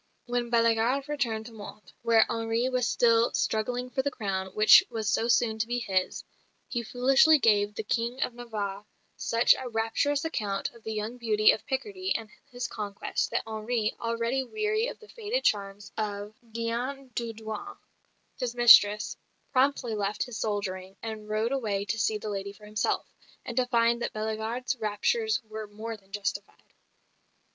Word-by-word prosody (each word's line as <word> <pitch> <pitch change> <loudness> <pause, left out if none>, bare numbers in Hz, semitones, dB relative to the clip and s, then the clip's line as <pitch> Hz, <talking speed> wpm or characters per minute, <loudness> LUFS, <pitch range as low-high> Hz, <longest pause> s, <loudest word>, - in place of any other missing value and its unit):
When 245 -1 -1
Bellegarde 230 +3 +2
returned 235 -7 -1
to 235 - -9
Mantes, 210 -1 -11
where 230 -1 +5
Henri 230 +2 0
was 250 -1 +1
still 230 -1 +4
struggling 245 +3 -1
for 265 - 0
the 285 - 0
crown 195 -7 -3
which 215 0 +8
was 225 -3 -3
so 230 - +1
soon 230 -2 +2
to 225 - 0
be 240 +1 -1
his, 190 -6 -1 0.4
he 240 - -2
foolishly 265 +6 +5
gave 210 -5 +3
the 220 - -3
King 235 +4 -1
of - - -3
Navarre 210 -5 -5 0.3
such 230 +1 +4
a 260 -1 -5
rapturous 235 +6 0
account 205 -11 -2
of 235 - -16
the 220 - -4
young 215 +3 -4
beauty 215 -2 +5
of - - -4
Picardy 370 +8 -2
and 220 -2 -4 0.2
his 250 0 -3
conquest 205 -2 -3
that - - -1
Henri, 220 0 -1
already 230 +3 -1
weary 430 - -1
of - - -6
the 435 - -16
faded 465 +3 -3
charms 200 0 -1
of 205 -1 -3 0.2
Diane 245 +4 -3
d'Audouins, 225 - -5 0.6
his 245 -1 -2
mistress, 210 -3 +7 0.4
promptly 260 -3 +2
left 205 0 -1
his 245 -3 -7
soldiering 195 -3 -3
and 215 -1 -6
rode 215 +3 0
away 210 -7 -1
to 220 +3 -2
see 215 +1 +1
the 210 - -7
lady 200 0 -4
for 210 +1 -15
himself, 215 +1 -1 0.4
and 235 - -5
to 255 -1 +2
find 235 -1 +2
that - - -2
Bellegarde's 220 +4 -2
raptures 255 - 0
were 215 -1 -7
more 220 +2 -6
than 195 -2 -21
justified. 200 0 -5
225 Hz, 165 wpm, -28 LUFS, 215-245 Hz, 0.6 s, which